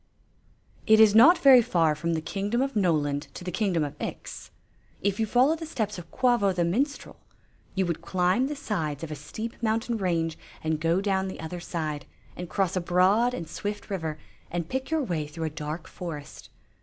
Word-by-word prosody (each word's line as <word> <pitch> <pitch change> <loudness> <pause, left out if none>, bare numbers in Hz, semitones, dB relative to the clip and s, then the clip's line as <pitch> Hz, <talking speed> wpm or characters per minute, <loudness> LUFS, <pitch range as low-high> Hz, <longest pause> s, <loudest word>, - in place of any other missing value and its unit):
It 220 -1 +6
is 220 -2 +7
not 270 +12 +8
very 265 -3 +8
far 170 -9 +2
from 165 +2 -2
the 160 - -2
kingdom 205 +7 -2
of 275 -2 -3
Noland 150 -7 +1
to - - -7
the 180 - -4
kingdom 180 -5 +1
of 145 - -4
Ix. - - -6 0.5
If 200 +1 0
you 220 - +1
followed 265 +8 +3
the 325 - -6
steps 215 - -3
of 170 -1 -11
Quavo 240 -6 +2
the 175 -1 +1
minstrel, 270 - -1 0.6
you 190 -1 +1
would 170 -2 -2
climb 185 +8 +1
the 295 - -4
sides 165 - -3
of 160 - -5
a - - -3
steep 215 +13 -7
mountain 225 +1 0
range, 165 -4 -1 0.2
and 160 -1 0
go 165 +3 +2
down 195 -1 0
on - - -3
the 190 - -7
other 165 +2 -5
side, 155 -4 -4 0.3
and 180 -1 -7
cross 195 -3 0
a 185 - 0
broad 195 +8 +3
and 170 - -6
swift 205 +4 -5
river, 160 -5 -3 0.3
and 170 -1 -3
pick 265 0 -3
your 320 -2 +1
way 165 - -2
through 160 +2 -5
a 155 - -3
dark 150 +2 -5
forest. 150 -6 -8
185 Hz, 200 wpm, -27 LUFS, 165-225 Hz, 0.6 s, not